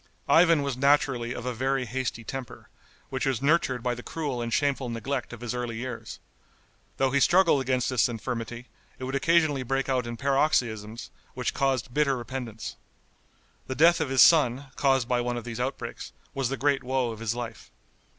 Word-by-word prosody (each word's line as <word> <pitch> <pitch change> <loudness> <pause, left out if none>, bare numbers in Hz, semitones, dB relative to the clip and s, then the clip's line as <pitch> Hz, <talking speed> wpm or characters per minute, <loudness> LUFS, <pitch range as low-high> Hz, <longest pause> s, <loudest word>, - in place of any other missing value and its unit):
Ivan 165 -3 +5
was 140 -3 -2
naturally 135 -3 +2
of 120 - -6
a 125 - -2
very 130 +2 0
hasty 120 -1 -3
temper, 130 +1 -7 0.4
which 130 0 -1
was 130 -3 0
nurtured 140 -4 +1
by 125 -1 0
the 120 - -7
cruel 140 -4 -4
and 115 0 -3
shameful 140 -1 0
neglect 120 +3 -3
of 120 -1 -9
his 120 -1 -3
early 120 -2 -3
years. 125 +1 -6 0.8
Though 135 -1 +2
he 140 - +3
struggled 170 -2 +4
against 130 -1 0
this 125 -1 +3
infirmity, 120 +1 -5 0.3
it - - -8
would 130 +1 -4
occasionally 155 -1 +3
break 135 +2 -1
out 125 -2 0
in 120 0 -5
paroxysms 115 -6 0 0.2
which - - -2
caused 130 -3 0
bitter 140 -2 +2
repentance. 120 -2 -6 0.9
The 130 - -3
death 170 +4 +5
of - - -1
his 135 -1 +7
son, 135 -4 +4
caused 135 -3 +2
by 125 -1 +1
one 120 0 -2
of 120 - -5
these 115 0 -6
outbreaks, 130 +2 -4 0.2
was 135 -3 -1
the 135 - -2
great 140 -1 +1
woe 130 -1 0
of 110 - -8
his 115 0 -2
life. 115 -2 -7
130 Hz, 185 wpm, -27 LUFS, 120-140 Hz, 0.9 s, his